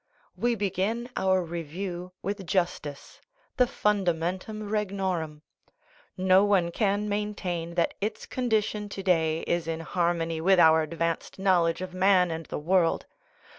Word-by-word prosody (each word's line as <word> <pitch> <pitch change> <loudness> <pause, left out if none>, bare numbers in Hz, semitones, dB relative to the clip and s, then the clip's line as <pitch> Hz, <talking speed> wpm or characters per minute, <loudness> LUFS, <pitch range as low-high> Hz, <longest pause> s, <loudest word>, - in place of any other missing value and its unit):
We 240 0 +1
begin 210 +4 -1
our 190 -1 +2
review 175 +2 -5
with 200 -2 -4
justice, 170 -6 -2 0.4
the 250 - +4
fundamentum 195 +1 -1
regnorum. 190 -7 -2 0.7
No 185 +1 +5
one 190 -4 +2
can 205 +2 0
maintain 195 -5 -3
that 170 - +1
its 210 +2 -3
condition 215 -4 -1
to 195 -1 -6
day 165 -3 +2
is 170 -1 -1
in 165 0 -3
harmony 165 -1 -1
with 190 +2 +4
our 160 -1 +6
advanced 165 +1 -3
knowledge 180 -3 +2
of 185 -1 -7
man 185 -1 +4
and 160 -1 -5
the - - -4
world. 170 +2 +2
185 Hz, 135 wpm, -27 LUFS, 165-200 Hz, 0.7 s, our